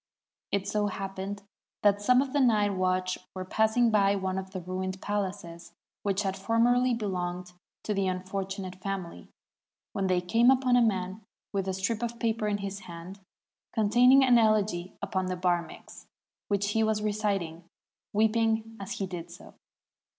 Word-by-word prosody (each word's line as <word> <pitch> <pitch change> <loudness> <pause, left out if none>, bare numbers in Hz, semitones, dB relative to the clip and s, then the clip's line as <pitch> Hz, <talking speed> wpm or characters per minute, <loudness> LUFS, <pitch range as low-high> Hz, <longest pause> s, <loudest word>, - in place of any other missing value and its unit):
It 200 -1 -1
so 205 0 0
happened 195 0 -5 0.4
that 205 -1 +4
some 250 +5 +4
of 275 -1 -8
the 290 - +2
night 215 -6 +3
watch 185 0 0 0.2
were 185 0 -4
passing 220 +4 +2
by 200 -1 +4
one 190 -1 -2
of 190 0 -7
the 190 0 -5
ruined 185 +1 -4
palaces 185 -5 -4 0.3
which 200 0 0
had 195 -1 -1
formerly 235 +5 +2
belonged 180 -4 -3 0.3
to 210 - -1
the 195 -1 0
unfortunate 185 0 -4
family, 190 -3 -5 0.7
when 195 -1 0
they 185 -1 +2
came 230 +7 +3
upon 260 -1 +4
a 245 - +5
man 190 -2 0 0.3
with 195 -1 -1
a 190 - -1
strip 210 +4 -1
of 235 0 -3
paper 225 -2 0
in 205 -1 0
his 200 0 -5
hand 170 +4 -9 0.6
con 210 -2 +1
taining 250 +3 +7
an 245 -2 +6
elegy 210 -5 +1
upon 185 -1 -1
the 185 - -2
Barmeks, 175 -2 -3 0.4
which 205 0 0
he 220 +2 +1
was 220 -1 +1
reciting, 200 -6 -1 0.5
weeping 225 +1 +1
as 195 +1 -5
he 195 - -3
did 175 -2 -7
so. 170 - -13
200 Hz, 165 wpm, -28 LUFS, 185-220 Hz, 0.7 s, taining